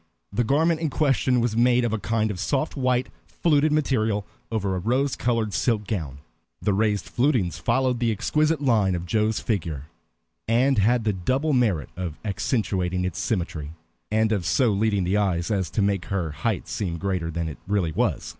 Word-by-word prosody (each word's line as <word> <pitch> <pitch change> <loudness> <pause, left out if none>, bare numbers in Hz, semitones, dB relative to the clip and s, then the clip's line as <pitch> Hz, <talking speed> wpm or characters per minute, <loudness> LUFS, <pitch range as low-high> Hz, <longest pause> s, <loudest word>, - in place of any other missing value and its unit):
The 120 - +1
garment 160 +6 +2
in 160 - 0
question 135 -4 +2
was 115 -2 0
made 120 +1 +4
of 115 - -1
a 110 - -1
kind 110 +2 0
of 95 - -6
soft 140 - -1
white, 130 -2 +1 0.2
fluted 155 -2 +2
material 110 -9 +1 0.3
over 100 -4 -1
a - - -1
rose 130 +8 0
colored 115 -4 0
silk 110 0 0
ground. 80 -10 -3 0.4
The 105 - 0
raised 105 0 +1
flutings 120 - 0
followed 130 -2 +1
the 120 -2 +1
exquisite 155 +8 +1
lines 110 -9 +2
of 85 0 -4
Joe's 110 +4 +1
figure, 80 - -2 0.6
and 125 +2 +3
had 115 +4 +3
the 105 -1 +1
double 130 - 0
merit 105 - +1
of 85 -4 -5
accentuating 95 -4 -1
its 90 - -3
symmetry, 85 - -2 0.4
and 110 +1 +2
of 100 -5 0
so 125 -5 +3
leading 100 -1 +1
the 95 +3 +1
eye 100 -4 +1
as 95 0 -1
to 105 - 0
make 100 -2 0
her 90 -5 -2
height 75 - -2
seem 85 -5 -3
greater 90 -2 -2
than 85 0 -3
it 75 - -7
really 100 -5 +1
was. - - -1
110 Hz, 185 wpm, -24 LUFS, 95-125 Hz, 0.6 s, made